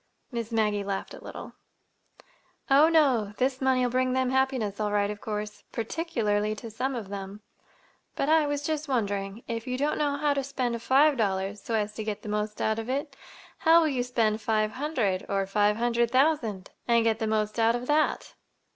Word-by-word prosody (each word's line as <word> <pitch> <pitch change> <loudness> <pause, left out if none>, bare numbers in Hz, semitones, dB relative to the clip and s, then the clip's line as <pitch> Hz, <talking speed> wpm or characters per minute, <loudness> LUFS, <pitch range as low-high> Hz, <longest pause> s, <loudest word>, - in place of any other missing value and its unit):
Miss 235 -2 -4
Maggie 210 -2 +1
laughed 195 -1 -4
a - - -11
little. - - -8 1.2
"Oh, 290 +4 +7
no! 260 -11 +3
This 260 +1 0
money'll 255 -2 +2
bring 255 0 +1
them 260 -1 +1
happiness 260 -6 0
all 210 -1 0
right, 205 0 +1
of 210 - -8
course,—particularly 215 +1 -2
to 225 +1 -8
some 255 +5 -2
of 215 -5 -6
them. 200 +1 -7 0.7
But 275 - -1
I 315 -1 +4
was 290 0 -2
just 310 -1 -2
wondering; 205 -4 -2
if 230 +1 -4
you 255 0 -2
don't 290 +3 0
know 290 -1 +1
how 295 0 +2
to 275 -1 -1
spend 250 -4 -2
five 275 +4 +4
dollars 195 -1 -1
so 230 - -2
as 210 -1 -1
to 220 - -5
get 210 -1 -4
the 210 - -6
most 210 0 -2
out 220 +1 0
of 225 +2 -6
it, 275 +1 -2 0.4
how 330 +1 +6
will 315 - +2
you 260 -3 -1
spend 225 -3 0
five 215 0 +1
hundred, 245 -10 -1
or 195 -1 0
five 205 +2 +2
hundred 235 0 +1
thousand—and 235 -4 +1
get 225 -1 +1
the 220 - -1
most 215 0 -1
out 225 +1 +4
of 245 +1 -4
that?" 300 +3 +1
230 Hz, 190 wpm, -27 LUFS, 210-265 Hz, 1.2 s, Oh